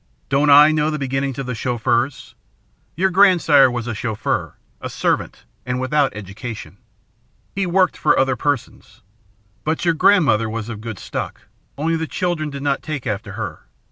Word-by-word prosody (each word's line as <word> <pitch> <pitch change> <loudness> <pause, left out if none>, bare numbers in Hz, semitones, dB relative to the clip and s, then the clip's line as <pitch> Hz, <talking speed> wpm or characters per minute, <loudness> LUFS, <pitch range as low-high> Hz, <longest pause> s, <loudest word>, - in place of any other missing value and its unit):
"Don't 140 +2 +2
I 145 +2 +8
know 155 0 +1
the 155 - -2
beginnings 135 -1 -2
of 135 - -4
the 125 - -3
Chauffeurs? 120 +2 -1 0.6
Your 190 +4 +1
grandsire 180 -8 +5
was 120 -2 -4
a 120 - -3
chauffeur, 110 -1 -3 0.3
a - - -5
servant, - - -2 0.2
and 125 0 -3
without 140 +2 +1
education. 105 +3 -8 0.8
He 195 -1 -1
worked 185 +1 +2
for 150 - +2
other 130 -1 +2
persons. 140 +1 -4 0.6
But 160 +3 -1
your 170 - +3
grandmother 155 - +3
was 115 0 -5
of 110 -2 -6
good 110 -3 -6
stock, - - -5 0.4
only 165 +3 0
the 160 0 -2
children 170 -4 -2
did 140 -1 -7
not 140 -1 0
take 150 -4 -5
after 100 -2 -4
her. - - -6
140 Hz, 165 wpm, -20 LUFS, 120-155 Hz, 0.8 s, I